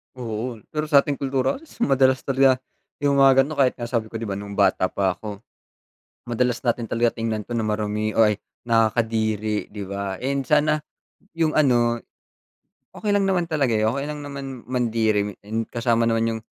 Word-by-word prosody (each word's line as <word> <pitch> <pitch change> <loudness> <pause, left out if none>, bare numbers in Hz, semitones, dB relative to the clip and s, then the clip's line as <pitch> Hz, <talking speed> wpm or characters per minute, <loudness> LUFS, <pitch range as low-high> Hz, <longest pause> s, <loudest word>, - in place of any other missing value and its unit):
Oo, 120 0 -4 0.2
pero 150 0 -2
sa 140 -2 +6
ating 145 -2 -3
kultura, 135 - 0
asus 320 - -17
madalas 130 -1 +3
talaga 135 -1 +4 0.5
yung 140 -1 +3
mga 135 -1 +6
ganun, 145 0 -6
kahit 130 -2 +3
nga 120 - -7
sabi 115 -2 -1
ko 115 - -13
'di 115 - -3
ba 100 -2 -3
nung 100 0 -7
bata 95 -2 +3
pa 95 -1 0
ako, 105 -1 -7 0.9
madalas 120 0 0
natin 120 -1 0
talaga 115 +2 0
tingnan 115 -1 -1
'to 120 +3 -5
na 110 - 0
marumi 105 0 -1
o 115 - +3
ay, 105 -2 +4 0.2
nakakadiri, 110 -2 0
'di 100 -2 -5
ba? 100 0 -4
And 135 0 -1
sana 150 0 +3 0.5
yung 165 -1 0
ano, 120 -5 +3 0.9
okey 210 - -3
lang 205 -1 +3
naman 180 -3 0
talaga, 140 -7 +1
eh, 110 - +1
okey 140 +6 0
lang 150 -1 -5
naman 135 -3 -7
mandiri, 110 -5 +1
and 110 +2 -3
kasama 115 -1 +1
naman 115 0 +1
yung - - -14
120 Hz, 180 wpm, -23 LUFS, 110-135 Hz, 0.9 s, sa